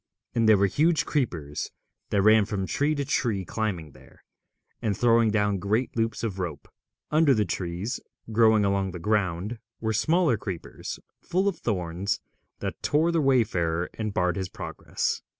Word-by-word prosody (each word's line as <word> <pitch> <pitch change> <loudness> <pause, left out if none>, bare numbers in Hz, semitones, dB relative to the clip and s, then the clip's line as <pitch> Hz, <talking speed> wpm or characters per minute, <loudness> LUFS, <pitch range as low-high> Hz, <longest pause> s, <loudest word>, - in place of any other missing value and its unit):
And 115 -2 +3
there 110 - +7
were 100 - +4
huge 155 - +2
creepers 85 - -2 0.4
that 100 - +2
ran 110 0 +6
from 100 -3 -2
tree 145 +10 +1
to 140 -1 -2
tree 115 -8 0
climbing 90 -9 -3
there, 65 -1 -19 0.6
and 105 -3 0
throwing 115 -1 +4
down 105 -2 +1
great 110 +7 0
loops 115 -1 -1
of 100 -4 -2
rope. 85 -6 -4 0.4
Under 150 -3 +5
the 105 -1 +2
trees, 90 +6 -3 0.3
growing 110 -2 +5
along 100 -1 0
the 90 - -6
ground, 100 +2 0 0.2
were 110 -1 -1
smaller 155 - +3
creepers 95 -5 -6 0.2
full 185 +3 0
of 195 -5 -1
thorns, 95 -2 -1 0.4
that - - -4
tore 160 +3 +2
the 165 -2 +2
wayfarer 90 - +1
and 110 -1 -3
barred 90 -1 +1
his 95 -1 -3
progress. - - -3
105 Hz, 160 wpm, -26 LUFS, 95-120 Hz, 0.6 s, there